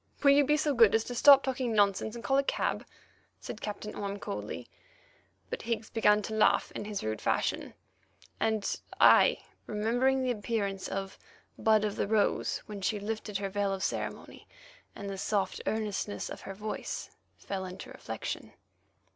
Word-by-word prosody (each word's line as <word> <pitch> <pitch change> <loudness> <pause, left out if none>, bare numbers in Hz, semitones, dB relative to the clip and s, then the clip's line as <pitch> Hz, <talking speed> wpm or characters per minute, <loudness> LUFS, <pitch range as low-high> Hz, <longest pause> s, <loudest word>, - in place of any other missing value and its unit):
"Will 280 - +7
you 285 +1 +6
be 300 +2 +3
so 300 -1 +1
good 230 -4 +6
as 225 - +2
to 245 - -6
stop 275 +3 +8
talking 255 -3 -1
nonsense 205 +1 +2
and 235 - -8
call 270 0 +3
a - - +2
cab," - - -1 0.5
said 210 - -8
Captain 210 0 -5
Orme 200 0 -4
coldly. 200 0 -5 0.8
But 485 - -3
Higgs 225 -2 -3
began 210 -2 +3
to 220 - -4
laugh 220 - +3
in - - -6
his 205 -1 -4
rude 110 0 -3
fashion, - - -1 0.6
and 220 -2 0 0.2
I, - - +6 0.2
remembering 245 +5 +1
the 255 - +1
appearance 205 -3 -2
of 195 0 -5 0.4
"Bud 215 -1 +3
of 210 -1 -3
the - - 0
Rose" 215 0 +1
when 205 -2 -7
she 205 +2 0
lifted 210 -1 -3
her 200 0 -3
veil 200 0 0
of 195 -1 -3
ceremony, - - -4 0.5
and 200 - -7
the 195 -1 -5
soft 200 -1 -1
earnestness 210 -2 -2
of - - -7
her 195 - -7
voice, 215 +2 -5 0.3
fell 195 -1 -4
into 185 0 -8
reflection. - - -6
215 Hz, 170 wpm, -30 LUFS, 200-230 Hz, 0.8 s, stop